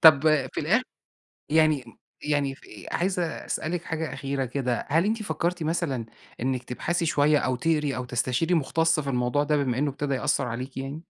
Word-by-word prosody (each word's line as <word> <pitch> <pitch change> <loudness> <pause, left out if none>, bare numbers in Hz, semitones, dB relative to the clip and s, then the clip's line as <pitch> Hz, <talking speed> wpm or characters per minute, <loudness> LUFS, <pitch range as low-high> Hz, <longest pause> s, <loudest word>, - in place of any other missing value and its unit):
طَب 155 -4 +9 0.3
في - - -1
الآخر - - +3 0.7
يعني 155 -4 +3 0.4
يعني 145 -2 0
في 110 - -13
عايز 185 +1 0
أسألِك 170 0 -2
حاجة 160 -4 -3
أخيرة 135 0 -2
كده، 125 -1 -2
هل 165 +5 +3
أنتِ 220 +1 0
فكّرتِ 170 -1 -1
مثلًا 155 -7 -1 0.3
إنِك 130 0 -1
تبحثي 170 +7 -1
شوية 150 -1 +4
أو 130 -1 0
تقري 150 -1 +1
أو 125 - -3
تستشيري 130 +7 0
مخُتص 165 +1 +2
في 140 -2 -3
الموضوع 125 +3 +1
ده، 150 +1 +2
بما 130 -3 0
إنه 145 0 +1
ابتدى 140 +1 -2
يأثّر 130 - +1
عليكِ 125 +3 -5
يعني؟ 135 +2 -4
145 Hz, 175 wpm, -26 LUFS, 130-160 Hz, 0.7 s, طَب